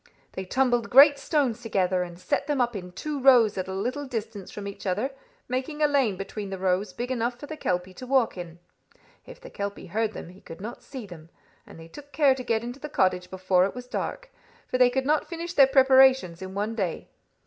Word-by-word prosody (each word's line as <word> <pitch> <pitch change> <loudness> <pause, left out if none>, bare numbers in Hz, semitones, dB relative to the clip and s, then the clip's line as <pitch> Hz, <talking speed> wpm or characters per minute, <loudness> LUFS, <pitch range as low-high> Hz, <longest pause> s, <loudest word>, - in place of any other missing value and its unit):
They 190 - -6
tumbled 245 +2 +1
great 280 +2 +7
stones 275 -5 0
together, 190 -5 0
and 175 -1 -6
set 185 +9 -2
them 295 -2 0
up 240 -2 +1
in 180 -2 -6
two 295 +10 -4
rows 250 -5 +5
at 185 -1 -3
a - - -5
little 255 +8 -3
distance 220 -5 -5
from 205 -1 -7
each 200 0 -7
other, 210 +9 -1 0.4
making 265 +5 -2
a - - +6
lane 265 -9 +1
between 200 +1 -6
the 195 - -5
rows 185 +1 0
big 240 +7 -5
enough 240 0 -2
for - - -8
the 315 - -7
kelpie 180 -8 -2
to 255 +7 -10
walk 260 -3 +2
in. 175 -2 -8 0.7
If - - -12
the - - -12
kelpie 200 0 -5
heard 220 0 0
them, - - -8
he 185 +2 -15
could 165 - -11
not 230 +5 -7
see 260 -5 -8
them, 165 -4 -12 0.4
and - - -13
they 165 - -11
took 285 - -13
care 280 -1 +4
to 260 -1 -6
get 230 -2 0
into 245 +3 -7
the 300 - -7
cottage 180 -6 +1
before 185 -1 +2
it 195 - -4
was 250 0 -7
dark, - - -5 0.4
for 255 - -2
they 250 -1 +6
could 265 +1 -1
not 300 +2 +1
finish 340 0 -5
their 275 -5 +7
preparations 265 -9 +5
in 190 0 -7
one 210 +3 -2
day. 190 -7 -3
230 Hz, 225 wpm, -26 LUFS, 190-265 Hz, 0.7 s, great